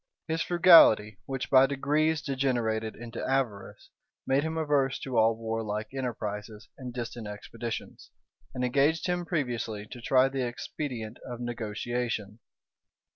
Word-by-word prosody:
His 160 0 -1
frugality, 165 - +6
which 135 -1 -4
by 135 0 +7
degrees 150 +3 +1
degenerated 120 -5 -1
into 115 +1 -7
avarice, 130 -7 -2 0.3
made 135 +1 +2
him 160 +1 -3
averse 145 -4 +1
to 130 -2 -5
all 110 0 +4
warlike 110 -1 -3
enterprises 110 -4 -5
and 125 -2 -7
distant 120 -2 -6
expeditions, 115 +2 -7 0.5
and 125 0 0
engaged 140 +6 +2
him 175 -1 -1
previously 120 - -2
to 120 - -8
try 130 +2 +4
the 135 0 -3
expedient 120 -1 -5
of 120 -2 -7
negotiation. 120 -2 -3
125 Hz, 130 wpm, -28 LUFS, 110-135 Hz, 0.5 s, by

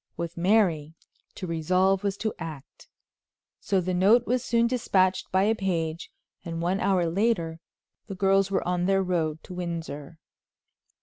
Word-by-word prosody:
With 170 -1 -4
Mary, 170 -5 +2 0.4
to - - -6
resolve 185 +4 +1
was 200 -1 -1
to 220 0 -2
act; 155 -3 -9 0.7
so 195 - 0
the 185 0 -2
note 210 +7 +4
was 250 0 0
soon 235 0 +2
dispatched 195 -6 +1
by 190 +1 +3
a 215 +2 +3
page, 170 -6 -2 0.3
and 165 -2 -5
one 180 +3 0
hour 190 -4 +2
later 170 -2 0 0.5
the 195 - -6
girls 195 0 +2
were 195 - -1
on 180 0 0
their 195 0 +2
road 160 -4 -1
to 185 - -10
Windsor. 165 -4 -6
185 Hz, 150 wpm, -26 LUFS, 165-195 Hz, 0.7 s, note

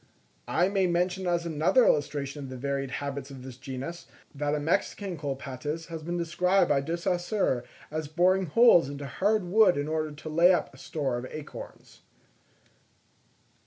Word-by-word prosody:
I 175 +2 +2
may 195 -1 +1
mention 180 +2 0
as 170 -1 0
another 165 - +3
illustration 145 -1 0
of - - -8
the 130 - -7
varied 140 +1 -2
habits 140 +1 -4
of 135 -2 -10
this 130 -1 -9
genus, 135 +6 -7 0.3
that 145 +1 -1
a - - -1
Mexican 185 +4 -1
Colaptes 145 +2 -5
has 165 -1 -6
been 175 +3 -3
described 180 +3 +2
by 140 -1 +3
De 165 +5 -2
Saussure 175 - 0 0.3
as 155 -1 -3
boring 180 +4 +2
holes 175 - +6
into 140 0 -6
hard 205 - +1
wood 185 0 +4
in 145 +1 -1
order 155 -1 -1
to 150 +2 -10
lay 170 +4 +5
up 180 - 0
a - - -15
store 135 -6 -2
of 125 - -6
acorns. 155 -1 -10
155 Hz, 165 wpm, -28 LUFS, 140-180 Hz, 0.3 s, holes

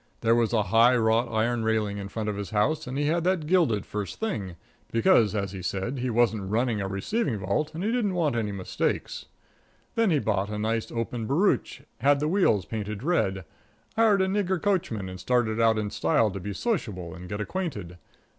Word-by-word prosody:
There 115 0 +3
was 115 -1 +2
a 110 -3 +2
high 115 +6 +5
wrought 115 +1 +2
iron 115 +1 0
railing 110 -2 0
in 100 - -5
front 110 +1 -4
of 105 - -1
his 100 -1 -5
house, 140 +9 0
and 130 +2 -4
he 145 - 0
had 165 +3 +1
that 180 -3 +1
gilded 150 - +2
first 105 -2 -5
thing, 105 - -3 0.4
because, 115 -2 +4
as 100 -2 -2
he 95 -2 -7
said, 100 +8 -3
he 125 +1 -1
wasn't 110 -4 +1
running 115 0 0
a 95 - -2
receiving 110 - -1
vault 125 - -2
and 170 - -4
he 215 - +1
didn't 220 -6 0
want 155 -7 +1
any 110 -3 -1
mistakes. 95 -2 -3 0.7
Then 230 -2 +2
he 160 - +3
bought 105 -6 0
a 105 - -4
nice, 110 +1 -1
open 115 -1 -3
barouche, 155 - +1 0.2
had 140 +3 +4
the 150 - 0
wheels 155 - +2
painted 105 0 -5
red, 95 - 0 0.5
hired 215 -4 +4
a - - +1
nigger 190 -2 0
coachman 160 - -1
and 95 0 -8
started 115 +2 +1
out 115 -1 +4
in 105 -1 -2
style 105 +5 +2
to 100 - -5
be 100 +3 -5
sociable 100 - -3
and 90 0 -10
get 105 - -4
acquainted. 105 - -4
115 Hz, 200 wpm, -26 LUFS, 100-155 Hz, 0.7 s, high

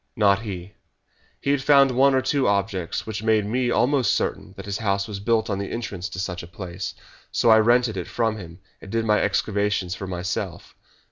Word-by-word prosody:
"Not 100 -2 +3
he. 100 -3 -7 0.7
He 140 - +1
had 140 -2 +1
found 140 -1 +5
one 135 +2 +4
or 130 - +2
two 135 0 +1
objects 100 -4 -1
which 110 -1 -4
made 110 -2 +2
me 120 +4 0
almost 130 +1 +2
certain - - -2
that - - -8
his 100 -1 -3
house 100 -3 0
was 100 -3 -6
built 110 +1 +1
on 100 -2 -2
the 100 - -4
entrance 100 -6 -4
to - - -8
such 90 -1 -3
a 85 - -10
place. 90 +1 -6 0.4
So 115 - +3
I 110 - +7
rented 120 -1 +3
it 90 - -4
from 110 -2 -1
him, 90 -2 -10 0.2
and 100 - -11
did 115 0 0
my 105 -1 +3
excavations 100 -3 0
for 95 0 -6
myself. 90 0 -4
105 Hz, 205 wpm, -24 LUFS, 95-120 Hz, 0.7 s, I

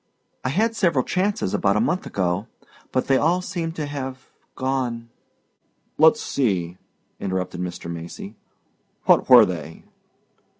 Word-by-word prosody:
I 130 - 0
had 225 - +1
several 170 - +2
chances 185 - 0
about 100 +1 +2
a - - +3
month 180 +11 0
ago 90 +2 -1 0.4
but 130 - 0
they 135 -1 +3
all 170 +6 +2
seem 175 -3 -3
to 155 -2 -4
have 135 -2 -6 0.2
gone 125 -3 -2 0.4
" - - -45
"Let's 160 +8 +6
see," 95 -9 -1 0.4
interrupted 90 -2 -3
Mr. 90 -1 -5
Macy. 85 0 -7 0.7
"What - - +4
were - - +10
they?" 80 -3 -6
130 Hz, 135 wpm, -23 LUFS, -, 0.7 s, were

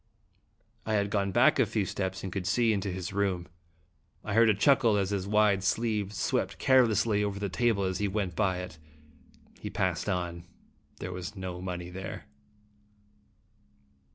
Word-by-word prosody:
I 110 - -1
had 100 -1 0
gone 100 -1 0
back 120 +6 +4
a 130 - +5
few 105 -1 -1
steps, 95 0 -3
and 95 -2 -5
could 95 -2 -3
see 115 +2 +3
into 100 -1 -2
his 90 0 -5
room. 95 -3 -1 0.8
I 105 - -4
heard 115 +1 +5
a 105 - +4
chuckle 120 -1 +4
as 100 -1 0
his 100 -1 -2
wide 105 -2 +3
sleeve 105 0 0
swept 100 - -1
carelessly 115 -5 +3
over 100 -1 -2
the 100 0 -3
table 110 0 +1
as 95 -1 -1
he 105 - +1
went 95 -3 -2
by 95 -4 0
it. 80 -3 -9 0.8
He - - -5
passed - - -1
on. 85 -1 -3 0.5
There 90 - -5
was 90 +4 -6
no 90 -2 -6
money 90 -1 -5
there. 95 +1 -7
100 Hz, 165 wpm, -29 LUFS, 95-105 Hz, 0.8 s, a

